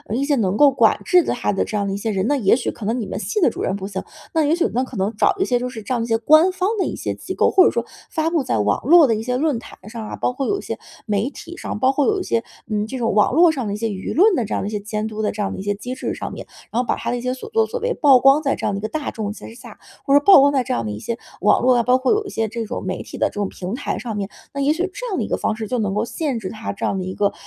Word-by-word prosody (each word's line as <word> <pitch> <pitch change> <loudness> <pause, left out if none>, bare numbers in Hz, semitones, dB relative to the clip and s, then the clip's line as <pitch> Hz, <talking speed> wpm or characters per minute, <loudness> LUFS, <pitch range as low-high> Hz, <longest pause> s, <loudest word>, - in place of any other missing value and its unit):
一 270 +3 0
些 290 0 +2
能 200 -2 0
够 290 +2 +6
管 265 - +3
制 360 -2 +5
他 240 -7 -1
的 195 - +1
这 215 - -3
样 200 -1 -1
的 195 - -2
一 - - -2
些 215 +2 -3
人。 195 -2 0
那 290 - +2
也 205 -4 +4
许 245 - -2
可 225 - -9
能 235 +3 0
你 225 - -3
们 - - -5
系 430 - -2
的 325 - +4
主 - - -7
任 190 - -1
不 195 -1 -5
行， 195 -2 -5 0.3
那 320 -2 +3
也 300 +3 +3
许 345 - +1
那 250 +3 +1
可 255 -3 -8
能 200 +3 -1
找 - - +2
一 385 - +1
些 245 -1 +1
就 250 +1 -3
是 225 -4 -8
这 230 - -3
样 240 - 0
一 - - -4
些 225 -1 +2
官 310 +10 +5
方 370 0 -1
的 - - +2
一 - - -4
些 - - -3
机 - - -7
构， - - +3
或 375 -1 +6
者 - - +5
说 - - -2 0.2
发 320 0 -1
布 325 -5 +1
在 185 - -1
网 105 0 +1
络 330 +4 +7
的 235 - +2
一 215 - -3
些 250 +2 -1
论 290 -4 0
坛 - - -13
上 225 -1 -7
啊， - - -5
包 250 - -1
括 270 +1 -3
有 405 - +1
一 - - -7
些 - - -5 0.3
媒 210 +3 0
体 335 +3 -10
上， - - -5
包 260 +3 +4
括 275 +1 +1
有 415 -2 +2
一 - - -3
些， 230 -9 0 0.3
嗯， 210 0 -1
这 260 - -5
种 230 -3 0
网 210 0 +3
络 335 +3 +6
上 260 -7 -3
的 200 - -2
一 - - -3
些 225 +1 -1
舆 195 -2 -5
论 405 +6 +5
的 245 - 0
这 210 - -3
样 - - -2
的 - - -3
一 - - -8
些 210 - -2
监 210 +1 -4
督 220 0 -5
的 215 - 0
这 210 - -11
样 195 - -2
的 - - -7
一 - - -4
些 205 +1 -1
机 250 +5 -6
制 - - -4
上 - - -6
面。 - - -8 0.2
然 235 - +1
后 250 - -6
把 - - +1
他 - - -3
的 245 - -1
一 - - -5
些 250 +1 -1
所 260 - -9
作 450 0 +2
所 485 - -4
为 480 +1 -1
曝 275 -5 +5
光 270 +4 +5
在 275 -3 0
这 - - -5
样 200 - 0
一 - - -3
个 215 - -3
大 305 +2 -3
众 210 -2 -4
之 225 - -11
下， 240 -3 -12 0.3
或 275 - +2
者 - - +8
曝 390 +3 +8
光 280 +1 +5
在 270 -3 +1
这 - - -2
样 115 -2 -2
一 105 - -5
些 230 - -4 0.2
网 210 - +4
络 255 0 +4
啊， 240 - +3
包 250 +2 +4
括 260 - +1
有 425 0 +1
一 - - -6
些 225 0 -1
这 230 +1 -4
种 - - -5
媒 185 0 -3
体 - - -9
的 - - +3
这 - - -19
种 205 -1 -1
平 185 +4 -5
台 285 - -3
上 230 -3 -5
面， 200 -1 -2 0.3
那 280 - -3
也 285 +2 +3
许 320 - -9
这 - - -6
样 390 - -2
的 - - 0
一 - - -4
个 - - 0
方 215 - -1
式 220 -1 -4
就 250 - -1
能 205 -3 -1
够 210 +3 0
限 275 -1 -3
制 190 -4 -5
他 220 +2 -5
这 200 - -4
样 195 - 0
的 185 - -3
一 185 0 -5
个， 200 0 0
240 Hz, 385 characters per minute, -21 LUFS, 210-285 Hz, 0.3 s, 者